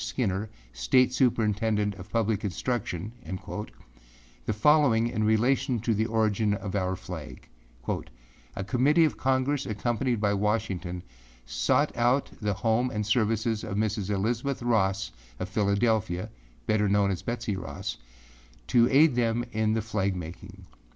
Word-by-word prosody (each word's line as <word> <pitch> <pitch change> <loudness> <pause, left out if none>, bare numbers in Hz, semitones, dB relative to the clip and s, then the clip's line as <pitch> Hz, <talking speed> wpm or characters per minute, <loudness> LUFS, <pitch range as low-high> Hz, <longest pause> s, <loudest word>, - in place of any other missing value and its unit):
Skinner, 105 -3 -1 0.2
State 125 - +3
Superintendent 110 -4 +1
of 95 +1 -11
Public 110 -3 +1
Instructionâ 105 0 -4 0.8
the - - +2
following 115 0 +4
in 110 -2 -1
relation 120 +4 +2
to 115 +2 0
the 110 +1 0
origin 110 -2 +1
of 100 -2 -6
our 95 -2 0
flag, 80 -8 -9 0.4
âA - - -2 0.6
Committee 140 - +4
of 155 - -1
Congress 135 +2 0
accompanied 120 +3 -1
by 100 -1 +2
Washington 100 -4 -1 0.4
sought - - +1
out 125 +3 +2
the 105 -1 0
home 115 +3 +3
and 105 -3 -2
services 110 0 +1
of 100 -3 -4
Mrs. 105 -2 -1
Elizabeth 115 +6 -1
Ross 95 -5 +1 0.3
of 95 +3 -5
Philadelphiaâbetter 100 - 0
known 100 0 +3
as 90 - -3
Betsey 115 -4 -3
Rossâto - - -3
aid 145 +1 +5
them 120 0 +1
in 110 -1 +1
the 110 - 0
flag 100 -3 -1
making. 90 +3 -9
105 Hz, 130 wpm, -27 LUFS, 95-120 Hz, 0.8 s, aid